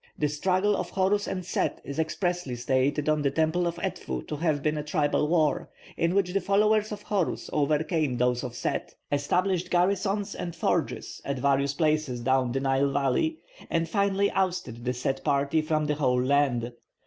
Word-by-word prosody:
The 150 - +1
struggle 185 +7 +1
of - - -3
Horus 195 +2 +1
and 185 -2 -3
Set 185 - -1
is 140 +2 -6
expressly 175 -3 -1
stated 130 +4 0
on 155 -1 +2
the 140 - +2
Temple 160 +4 +1
of 170 - -2
Edfu 65 -1 -4
to - - -2
have 155 -3 0
been 155 0 +1
a 150 - -2
tribal 150 -1 +1
war, 155 -4 +1 0.3
in 170 +2 +1
which 190 -3 +2
the 195 - +1
followers 210 +3 +2
of 205 0 -6
Horus 195 -5 -1
overcame 150 -2 +1
those 125 +1 +1
of 125 -2 -5
Set, 125 - -3 0.2
established 180 +5 +1
garrisons 195 +3 +1
and 170 -1 -5
forges 165 - -1
at 140 -1 -2
various 140 +1 +1
places 155 -5 +1
down 130 0 +2
the 135 - 0
Nile 135 +1 +2
valley, 140 - +1 0.3
and 165 0 0
finally 200 +2 +1
ousted 180 -11 -2
the 125 - 0
Set 135 +2 -2
party 140 +3 +2
from 155 0 0
the 150 - +1
whole 125 -4 +1
land. 130 -3 +1
155 Hz, 180 wpm, -27 LUFS, 135-180 Hz, 0.3 s, on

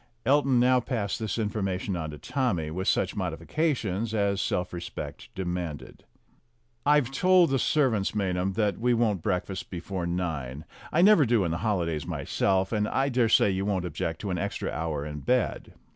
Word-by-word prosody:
Elton 135 -2 +4
now 125 +1 +4
passed 115 -5 -2
this 110 -2 -2
information 100 -3 -2
on 80 -2 -3
to 75 - -8
Tommy, 90 - -1
with 95 +4 -3
such 95 - +1
modifications 105 - -1
as 100 -1 +1
self 90 0 -1
respect 85 -1 -7
demanded. 90 -5 -5 0.8
"I've 145 -3 +4
told 180 +2 +4
the 135 - +2
servants, 120 -12 +1
Maynham, 95 -1 0
that 105 0 0
we 120 +1 +2
won't 110 -6 +1
breakfast 90 +1 -2
before 90 0 -4
nine. 80 -5 -3 0.3
I 170 - +4
never 205 -5 +7
do 115 -3 +3
in 85 - -1
the 85 - -1
holidays, 85 -8 -1
myself, 95 -1 0
and 105 -2 +1
I 135 +4 +1
dare 120 -3 +2
say 105 - +5
you 95 +1 -1
won't 95 -3 -1
object 80 0 -3
to 100 - -3
an 90 - -1
extra - - -3
hour 75 0 -3
in 75 -1 -5
bed." 125 - -1
100 Hz, 175 wpm, -27 LUFS, 90-120 Hz, 0.8 s, never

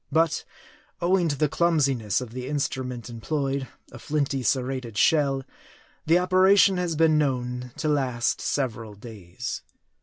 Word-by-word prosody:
But 160 +1 +1 0.5
owing 175 0 +2
to 145 - 0
the 150 - +2
clumsiness 140 - +1
of 125 -3 -7
the 125 +1 -6
instrument 130 -4 -3
employed 135 +3 -2 0.2
a 120 - -10
flinty, 140 -1 -1
ser 125 +2 +1
rated 125 -4 -5
shell 140 -2 +3 0.6
the 165 +2 +5
operation 185 +2 +5
has 175 -2 -1
been 155 -1 +4
known 125 -3 -2
to 155 - -2
last 130 -5 0
several 115 -6 -2
days. 105 0 -7
135 Hz, 140 wpm, -25 LUFS, 125-155 Hz, 0.6 s, the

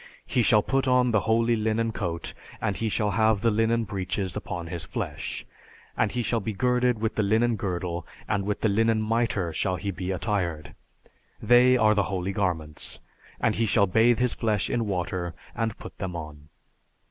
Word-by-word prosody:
He 125 - +1
shall 105 -2 +4
put 135 0 0
on 125 -1 +4
the 110 - +4
holy 115 +1 +3
linen 110 +1 0
coat, 85 -6 -4 0.3
and 100 - -1
he 110 +4 -1
shall 105 -1 0
have 110 0 +2
the 115 0 +3
linen 115 +2 +2
breeches 95 -2 -3
upon 85 -1 -4
his 85 0 -5
flesh, - - -5 0.5
and - - +1
he 120 -1 -1
shall 115 +2 0
be 110 +1 -3
girded 125 +1 +1
with 110 0 -1
the - - 0
linen 110 +3 +2
girdle, 90 -4 -3 0.2
and 105 -2 0
with 105 +1 -2
the - - +3
linen 110 +2 +2
mitre 110 -6 0
shall 90 +3 0
he 100 +2 -3
be 90 0 -5
attired; 90 -6 -2 0.7
they 125 +1 +5
are 110 -2 +4
the 100 -2 +1
holy 95 -1 -2
garments; 85 -6 -2 0.4
and - - +2
he 115 0 0
shall 100 0 +4
bathe 110 +5 +4
his 125 -1 +1
flesh 105 -3 0
in 115 -2 0
water 90 -2 -2 0.2
and 110 -2 -2
put - - -10
them 95 -3 -4
on. 75 -2 -8
105 Hz, 185 wpm, -26 LUFS, 90-115 Hz, 0.7 s, they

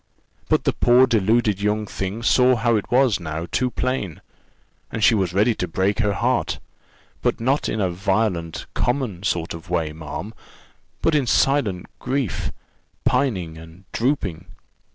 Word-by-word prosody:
But - - +3
the - - +1
poor 125 +2 +5
deluded 110 -3 +2
young 105 +1 0
thing 100 +3 -4
saw 125 +1 +5
how 115 0 +2
it 105 - -2
was 125 -5 +3
now 80 -1 -4
too 125 0 +1
plain, 125 -7 -2 0.7
and 110 - -2
she 115 - +6
was 95 -5 +1
ready 105 +6 +3
to 90 - -3
break 95 +5 0
her 105 -3 +2
heart; 85 - 0 0.6
but - - 0
not 130 +5 +1
in 110 - -2
a 95 -3 +1
violent, 95 -3 -1
common 120 -8 -1
sort 85 -4 -1
of 85 0 -10
way, 80 -3 -1
ma'am, 80 +7 -6 0.7
but 165 - +3
in 145 -4 +2
silent 115 -9 +2
grief, 130 -4 -2 0.5
pining 90 -12 0
and 80 +3 -14
drooping. 105 - -1
105 Hz, 155 wpm, -22 LUFS, 90-120 Hz, 0.7 s, she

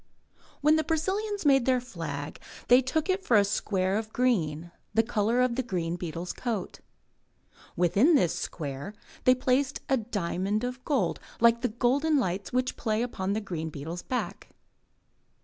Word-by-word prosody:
When 305 +2 +5
the 315 - +1
Brazilians 385 +6 -1
made 270 -3 +4
their 255 -1 +4
flag, 160 - -6 0.3
they 250 +2 +8
took 295 +5 -1 0.2
for 235 - +3
it - - +7
a - - +1
square 195 0 0
of 220 -1 -7
green, 175 -11 0 0.2
the 225 - +5
colour 225 +1 +1
of 250 -2 +2
the 260 - +1
green 175 -8 -2
beetle's 175 0 -5
coat. 225 -7 -4 1.0
Within 195 - +4
this 180 - +3
square 145 +5 -5 0.3
they 255 - +6
placed 260 +2 0
a 270 - +4
diamond 205 -1 -2
of 250 +1 -4
gold 250 - 0 0.2
like 235 0 +5
the 250 - +2
golden 270 +7 +2
lights 195 -5 -1
which 255 0 0
play 220 0 0
upon 195 -5 -2
the 215 - -1
green 165 -5 -4
beetle's 160 +4 -6
back. 255 - -4
225 Hz, 160 wpm, -28 LUFS, 180-255 Hz, 1.0 s, they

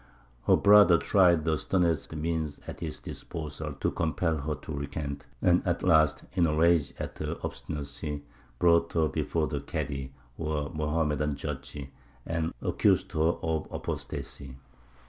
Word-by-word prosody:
Her - - +7
brother 100 -4 +7
tried 85 -1 +4
the 80 -2 +1
sternest 85 -4 0
means 80 -1 -2
at - - -7
his - - -5
disposal 75 -1 -6
to 70 - -1
compel 80 0 0
her 75 +2 -2
to 80 - -8
recant, 70 0 -5 0.2
and 90 0 +5
at - - -1
last, 80 -2 +4
in 90 -3 +3
a 75 - 0
rage 80 -5 +3
at - - -6
her - - -3
obstinacy, 75 0 -4 0.3
brought 85 +2 +4
her 80 -2 +3
before 80 +2 -1
the 75 -2 -3
Kādy, 70 -1 -4 0.3
or 75 -2 -2
Mohammedan 75 -1 0
judge, 75 - -5 0.5
and 80 0 -1
accused - - +2
her - - -3 0.2
of 80 -2 -1
apostacy. 65 -2 -5
80 Hz, 145 wpm, -29 LUFS, 75-85 Hz, 0.5 s, Her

